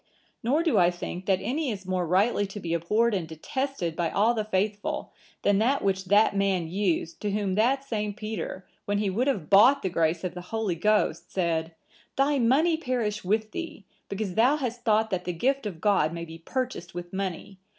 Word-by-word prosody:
Nor 285 +8 +2
do 310 - +3
I 175 -1 +5
think 180 +1 -6
that 190 -2 +4
any 290 +2 -1
is 195 -4 -5
more 185 -2 -1
rightly 200 +4 +2
to 195 +2 -7
be 170 -3 -3
abhorred 210 +8 +2
and 180 -5 -1
detested 175 - -3
by 170 -1 0
all 215 +7 +3
the 220 -2 -1
faithful, 205 0 -2 0.3
than 205 -1 +3
that 265 +6 +2
which 190 -1 0
that 205 +2 +4
man 195 -4 +1
used, 175 -2 -1
to 210 - -1
whom 200 -2 -1
that 250 +7 +2
same 210 -5 -3
Peter, 215 -4 -5 0.2
when 205 0 0
he 205 -2 0
would 240 +8 0
have 200 - -1
bought 245 +8 +6
the 190 - 0
grace 165 0 +1
of 180 -2 -3
the 180 - -7
Holy 220 -4 -1
Ghost, 210 +5 +1
said,(982) 165 -3 -1 0.4
'Thy 280 +1 +2
money 295 +8 +3
perish 235 -8 -2
with 215 +3 0
thee, 335 - -6 0.2
because 200 -2 -3
thou 245 +8 +4
hast 245 -4 -4
thought 220 -1 +2
that 180 -1 -2
the 180 - -2
gift 265 +7 0
of 175 -6 -7
God 170 -5 +2
may 170 0 -5
be 165 0 -10
purchased 245 -4 -4
with 175 0 -7
money. 190 0 -4
205 Hz, 200 wpm, -27 LUFS, 180-235 Hz, 0.4 s, bought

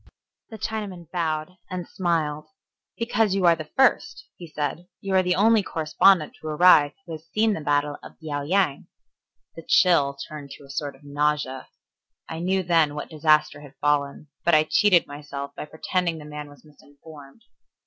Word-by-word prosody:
The 220 - -9
Chinaman 200 -6 -5
bowed 165 0 -2
and 180 -2 -5
smiled. 160 -4 -2 0.5
"Because 225 -4 +1
you 190 -2 +1
are 170 -1 +6
the 155 -1 -9
first," 265 +6 +2
he 175 - -10
said. 155 +3 -4
"You 195 -1 -4
are 190 - +5
the 180 0 +1
only 220 +2 +4
correspondent 160 0 +2
to 155 - -7
arrive 150 -2 +5
who 170 - -10
has 160 0 -8
seen 215 +4 +1
the 180 - -4
battle 145 0 0
of - - -12
Liao 150 -3 -4
Yang." 165 -1 0 0.7
The 165 - -8
chill 155 -5 +3
turned 150 -3 -9
to - - -17
a 135 - -11
sort 140 0 -4
of 135 - -22
nausea. 145 -2 -1 0.6
I 160 - -6
knew 190 +2 0
then 165 -4 +2
what 150 - -6
disaster 155 -1 +2
had 145 -1 -14
fallen, 145 0 -1
but 170 -1 +4
I 155 - +5
cheated 180 +2 +3
myself 145 -1 -8
by - - -6
pretending 170 +2 -2
the 150 - -10
man 150 -1 -8
was 145 +2 -18
misinformed. 145 +3 -16
155 Hz, 175 wpm, -24 LUFS, 145-180 Hz, 0.7 s, are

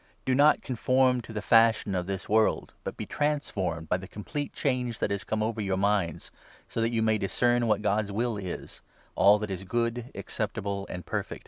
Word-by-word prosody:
Do 130 - +2
not 145 +3 +5
conform 130 0 +2
to 115 - -11
the 105 -1 -4
fashion 115 -3 +4
of 90 -1 -1
this 95 -1 -4
world; 110 +1 +2
but - - -5
be - - -4
trans 150 0 0
2 - - -13
formed 85 -4 -2
by 90 - +2
the 95 +1 -9
complete 145 +9 -5
change 125 -4 -1
that - - -1
has 100 0 -2
come 110 0 -1
over 110 0 -2
your 95 -2 0
minds, 100 -5 0 0.4
so 115 - -3
that 115 - +2
you 115 -1 0
may 110 -1 +2
discern 120 +4 +1
what 105 -1 +1
God's 105 0 +1
will 115 +3 -1
is 95 -4 -7 0.2
— - - -31
all 105 +1 +6
that 105 -1 -4
is 95 0 -4
good, 115 +4 -1
acceptable, 100 -3 -3
and 90 -2 -6
perfect. - - -3
110 Hz, 215 wpm, -28 LUFS, 100-120 Hz, 0.4 s, all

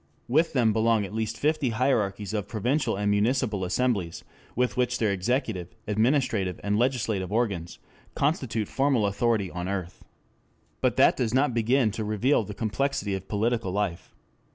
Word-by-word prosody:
With 155 +7 +2
them 115 -5 +3
belong 110 -1 +2
at 100 - -9
least 110 0 -2
fifty 150 -3 +1
hierarchies 110 -5 0
of 105 -2 -2
provincial 120 +3 0
and 105 +1 0
municipal 105 -1 +1
assemblies, 95 -3 -1 0.3
which 125 -4 0
with 125 0 +1
their 110 -4 +1
executive, 100 -1 -2
administrative 110 - +1
and 100 0 0
legislative 110 -5 0
organs, 100 -7 -1 0.4
constitute 130 -8 0
formal 135 -5 +1
authority 100 -1 0
on 90 +1 -4
earth. 95 -2 -5 0.8
But - - +2
that - - +5
does 120 -1 0
not 135 -1 +2
begin 120 0 +2
to 110 +1 -4
reveal 110 +5 +1
the 105 0 -8
complexity 110 -1 -1
of 95 0 -5
political 110 -1 0
life. 95 -3 -3
110 Hz, 155 wpm, -26 LUFS, 100-125 Hz, 0.8 s, that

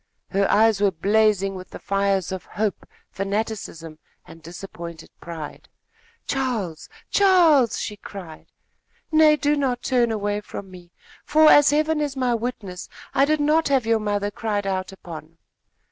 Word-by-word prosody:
Her 195 0 +1
eyes 215 -1 +4
were 205 - +4
blazing 200 +2 +2
with 185 -1 -9
the - - -9
fires 195 -2 0
of 190 -3 -5
hope, 210 +1 -3 0.2
fanaticism 195 -6 -4 0.3
and 165 - -14
disappointed 170 -1 -9
pride. 160 -3 -8 0.6
"Charles! 230 - -3 0.2
Charles!" 340 - +4
she 210 - -5
cried. 180 -7 -10 0.6
"Nay, 310 -1 +6
do 290 +1 +1
not 260 -4 -1
turn 245 -3 +2
away 205 -1 -2
from 200 -2 -9
me, 175 -1 -14 0.3
for, 310 +1 +5
as 290 -1 +7
Heaven 305 +1 +1
is 285 -2 -3
my 250 -2 +1
witness, 220 -6 -5 0.2
I 275 - +4
did 305 +1 +1
not 310 +2 +3
have 270 -4 +2
your 225 0 +2
mother 205 -1 -1
cried 205 -2 -2
out 190 0 -2
upon!" 165 -4 -11
205 Hz, 145 wpm, -23 LUFS, 185-265 Hz, 0.6 s, as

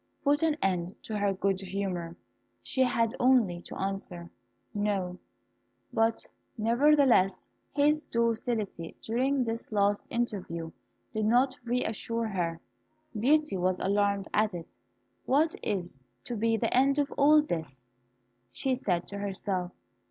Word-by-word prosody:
put 290 +1 +3
an 320 -2 +2
end 180 -1 0
to 220 - -5
her 205 -1 +1
good 195 0 0
humour. 185 -3 -3 0.5
She 260 - -1
had 230 -3 +2
only 235 -9 +3
to - - -9
answer 190 -3 -4 0.4
"No;" 195 -3 -1 0.7
but, 225 0 +1 0.3
nevertheless, 240 -3 +3 0.2
his 300 +1 +2
docility 230 -6 -1
during 260 +4 +1
this 230 -1 -4
last 205 -1 +1
interview 180 -8 -3 0.4
did 215 -1 0
not 255 +3 +3
re 245 +1 0
assure 230 +1 -2
her. 170 -4 -2 0.6
Beauty 300 -1 +3
was 185 0 +1
alarmed 200 0 +1
at 215 -2 +2
it. 170 -2 -8 0.5
"What 305 +4 +3
is 175 -10 -3 0.2
to 240 - -4
be 225 +1 +1
the - - 0
end 275 +2 +4
of 285 -1 +1
all 300 +1 +5
this?" 160 - -5 0.7
she 260 - -1
said 185 -9 -1
to 200 - -5
herself. 190 -2 -2
210 Hz, 130 wpm, -29 LUFS, 185-250 Hz, 0.7 s, all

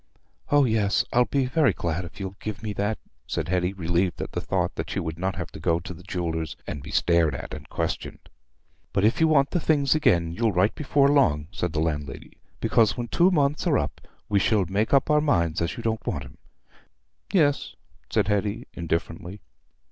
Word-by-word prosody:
"Oh 145 -1 +5
yes, 110 -4 +2
I'll 125 +1 +5
be 135 0 0
very 130 - +3
glad 85 +1 -2
if 90 +3 -12
you'll 95 -1 -5
give 110 0 -6
me 105 -1 -3
that," 105 +2 -1 0.3
said 80 - -3
Hetty, 90 0 +1
relieved 90 -1 -1
at - - -4
the - - -3
thought - - -1
that - - -5
she - - -2
would 80 0 -4
not 95 +1 -1
have 90 -5 -5
to - - -9
go 85 +1 +1
to 85 +2 -8
the 85 - -13
jeweller's 85 -3 -3
and 75 - -5
be 70 - -10
stared 85 0 +2
at - - -7
and - - -9
questioned. - - -4 0.7
"But 100 - +1
if 115 +8 +2
you 160 - +6
want 140 -3 +3
the 175 - +1
things 145 -4 +2
again, 85 - +2
you'll 110 +4 0
write 95 +4 +3
before 140 -1 +2
long," 80 - +3
said 90 -4 -3
the 80 - 0
landlady, 75 -3 -4 0.2
"because 115 0 +3
when 120 -1 -4
two 175 +2 +4
months 150 -1 +1
are 145 -5 +4
up, - - -3 0.3
we 100 -1 +2
shall 100 -1 +2
make 100 +5 -1
up 140 +2 +3
our 150 0 +4
minds 85 - +1
as 85 - -2
you 115 - -6
don't 115 0 -2
want 70 -5 -2
'em." - - -15 0.9
"Yes," 145 -7 +2 0.3
said 105 -3 +1
Hetty 105 +3 -1
indifferently. 85 +3 -3
100 Hz, 205 wpm, -25 LUFS, 85-130 Hz, 0.9 s, you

